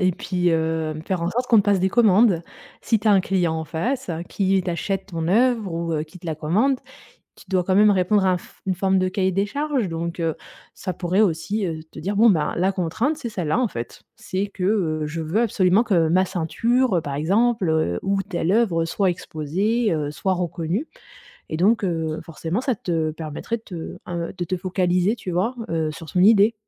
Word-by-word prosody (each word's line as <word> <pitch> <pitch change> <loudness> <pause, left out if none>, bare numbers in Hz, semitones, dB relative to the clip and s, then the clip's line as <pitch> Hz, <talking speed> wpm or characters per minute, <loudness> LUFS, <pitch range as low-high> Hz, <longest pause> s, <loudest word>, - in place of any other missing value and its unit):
et 185 -1 +3
puis, 180 -1 -1
heu, 160 -1 0
faire 185 -3 -1
en 170 - 0
sorte 245 +5 -1
qu'on 230 - +5
te 205 - +5
passe 200 -1 +2
des 185 +1 +2
commandes. 205 -4 +4 0.4
Si 225 - +2
tu 210 - -7
as 210 - +6
un 195 - +5
client 180 -3 0
en 160 0 -3
face, 175 - -2 0.2
qui 195 -1 +1
t'achète 195 +2 -2
ton 165 -4 -3
œuvre 225 -1 +2
ou, 165 0 -2
heu, 155 -1 0
qui 160 +3 -12
te 175 - -11
la 160 - -1
commande, 210 - +1 0.6
tu - - -17
dois 185 -2 +2
quand 185 - +1
même 210 +1 +6
répondre 190 +1 +2
à 185 - +4
un 180 - +1
fo - - -16
une 190 -1 0
forme 190 +1 +2
de 185 - +1
cahier 190 0 0
des 195 +2 +1
charges 280 -2 -1
donc, 170 +1 -4
heu, 165 -1 0 0.4
ça 185 - -5
pourrait 180 +2 -1
aussi, 205 +2 +1
heu, 160 -3 -4
te - - -9
dire: 200 +2 -3
«Bon 225 +3 +6
ben, 165 -7 +1
la 185 +3 +2
contrainte 200 - -1
c'est 245 - -5
celle-là, 180 -1 -1
en 255 - +2
fait. 120 - -7
C'est 190 +2 -3
que, 195 -2 -7
heu, 180 -6 +1
je 155 +2 -5
veux 165 +8 0
absolument 195 -2 +3
que 175 -8 +2
ma 180 +4 +3
ceinture 195 +4 +1
par 140 -1 -4
exemple 165 - +1
ou 195 0 +1
telle 185 -2 -1
œuvre, 200 -8 +2
heu, - - -2
soit 190 +3 +1
exposée, 185 +8 -1
heu, 150 -2 -2
soit 185 +6 -1
reconnue» 175 - -2 0.6
et 155 - -3
donc, 210 +6 +3
heu, 160 -3 -1
forcément 165 +6 -3
ça 260 -2 0
te 165 -5 -1
permettrait 155 +8 -4
de 225 - -21
te, 190 - -9 0.3
heu, 170 -1 -3
de 175 - -2
te 185 - -2
focaliser, 185 +2 +1
tu 190 -5 -6
vois, 190 +9 0
heu, 160 -2 0
sur 155 +1 -10
son 180 - +1
idée. 210 +2 +6
185 Hz, 220 wpm, -23 LUFS, 165-210 Hz, 0.6 s, as